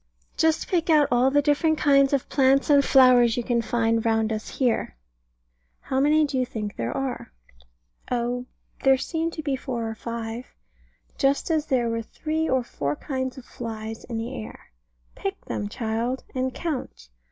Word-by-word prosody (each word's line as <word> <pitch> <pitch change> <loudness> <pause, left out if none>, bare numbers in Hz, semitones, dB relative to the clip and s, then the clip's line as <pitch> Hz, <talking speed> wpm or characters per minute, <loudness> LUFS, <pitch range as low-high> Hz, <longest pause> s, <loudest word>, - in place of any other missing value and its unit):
Just 320 0 +1
pick 340 -2 0
out 300 -3 +5
all 245 +2 +4
the 290 +1 +2
different 310 +2 +2
kinds 275 -2 +4
of 275 -3 0
plants 275 +1 +3
and 285 -1 +6
flowers 250 -4 +5
you 245 - -1
can 235 -1 +1
find 230 -1 +1
round 225 -1 +1
us 215 0 -5
here. 240 - 0 0.8
How 265 - -2
many 300 +2 +4
do 275 -2 -2
you - - +2
think 215 -5 -5
there 115 0 -3
are? 265 - -4 0.8
Oh 245 +1 -1 0.3
there 270 -1 +5
seem 325 +4 -2
to 320 -1 -7
be 280 -3 0
four 245 -3 -4
or 225 - -3
five. 230 +2 -6 0.6
Just 275 +4 +1
as 310 -2 0
there 245 -3 +1
were 230 0 -1
three 315 +7 -3
or 260 -1 +2
four 145 -10 -3
kinds 260 - -4
of 255 - -10
flies 225 -2 -6
in 230 - -5
the 225 +1 -4
air. 105 - -13 0.4
Pick 195 - -5
them, 205 - -3
child, 230 +3 -2
and 260 0 -1
count. 250 - -5
255 Hz, 175 wpm, -25 LUFS, 230-280 Hz, 0.8 s, and